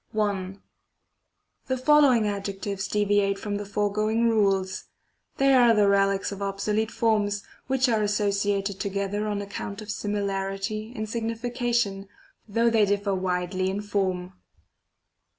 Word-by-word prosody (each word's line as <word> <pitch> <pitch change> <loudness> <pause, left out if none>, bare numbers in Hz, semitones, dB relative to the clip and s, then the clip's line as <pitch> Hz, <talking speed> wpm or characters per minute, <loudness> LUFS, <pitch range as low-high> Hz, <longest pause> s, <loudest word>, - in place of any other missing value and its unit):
1, 200 -3 -1 1.1
The 260 -1 0
following 260 -4 +5
adjectives 200 -1 -3
deviate 205 -1 +1
from 205 0 -3
the 205 0 -6
fore 205 0 -1
going 220 +2 +1
rules; 195 -4 +1 0.5
they 275 0 +4
are 240 -3 +6
the 210 -1 +4
relics 195 0 +2
of 200 0 -7
obsolete 210 +2 -1
forms, 205 -3 0 0.2
which 265 0 +2
are 225 -3 +2
associated 200 -1 0
together 200 +1 -2
on 205 -1 -2
account 200 0 -6
of 215 -1 -6
similarity 200 +1 -3
in 215 - -3
sig 225 +1 -3
nification, 230 -3 -1 0.4
though 230 +2 +2
they 220 -2 +4
differ 200 0 0
widely 185 0 -1
in 195 +2 -2
form. 190 -3 -2
205 Hz, 135 wpm, -26 LUFS, 195-220 Hz, 1.1 s, are